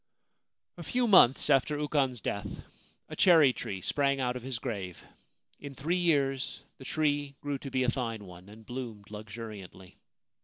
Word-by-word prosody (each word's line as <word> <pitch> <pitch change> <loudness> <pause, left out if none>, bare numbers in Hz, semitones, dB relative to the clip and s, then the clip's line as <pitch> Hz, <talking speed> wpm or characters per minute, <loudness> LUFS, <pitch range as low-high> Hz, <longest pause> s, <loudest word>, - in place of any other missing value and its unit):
A - - -7
few 250 -1 0
months 160 - +6
after 140 +2 +3
Ukon's 140 -5 0
death, 100 0 -3 0.6
a - - -8
cherry 160 -8 +6
tree 95 -5 -5
sprang 140 +5 +1
out 125 -1 0
of 125 - -5
his 130 0 -4
grave. 100 -8 -5 0.6
In 140 -1 -8
three 160 +7 -1
years 140 -7 +1 0.2
the 130 - -10
tree 145 -2 0
grew 145 -2 -3
to 135 - -7
be 130 -1 0
a 125 - +2
fine 115 -5 -4
one 90 +1 -13
and 110 +1 -14
bloomed 115 -5 -7
luxuriantly. 105 -4 -9
130 Hz, 160 wpm, -30 LUFS, 110-145 Hz, 0.6 s, months